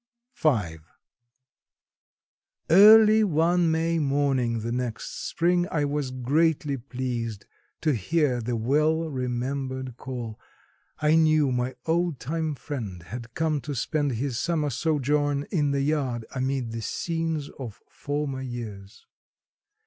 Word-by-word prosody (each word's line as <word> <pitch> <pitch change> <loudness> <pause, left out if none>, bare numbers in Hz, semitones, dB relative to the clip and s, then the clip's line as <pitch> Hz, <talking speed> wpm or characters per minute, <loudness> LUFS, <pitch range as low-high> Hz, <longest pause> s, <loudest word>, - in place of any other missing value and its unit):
V. 105 - +1 1.9
Early 215 +3 +8
one 170 -1 +2
May 165 +1 +1
morning 135 -5 +1
the 115 +2 -3
next 120 -2 -4
spring 175 +1 +2
I 150 -3 0
was 145 -2 -2
greatly 140 +3 +1
pleased 120 -4 -4 0.4
to 155 -2 +2
hear 125 - +1
the 120 +1 -2
well 155 +8 +1
remembered 130 0 -3
call. 120 -5 -6 0.6
I 150 +1 +4
knew 155 -3 +4
my 125 +1 -1
old 170 -2 0
time 155 +2 -2
friend 110 - -6
had 115 +6 -8
come 155 -3 0
to 145 0 -5
spend 145 +2 0
his 125 +1 -2
summer 155 -4 0
sojourn 145 0 0
in 150 -6 +1
the 140 0 0
yard 135 -6 -1
amid 130 -2 -1
the 115 0 -4
scenes 165 +3 -2
of 120 -6 -7
former 145 -2 -3
years. 110 -6 -8
140 Hz, 120 wpm, -26 LUFS, 125-155 Hz, 1.9 s, Early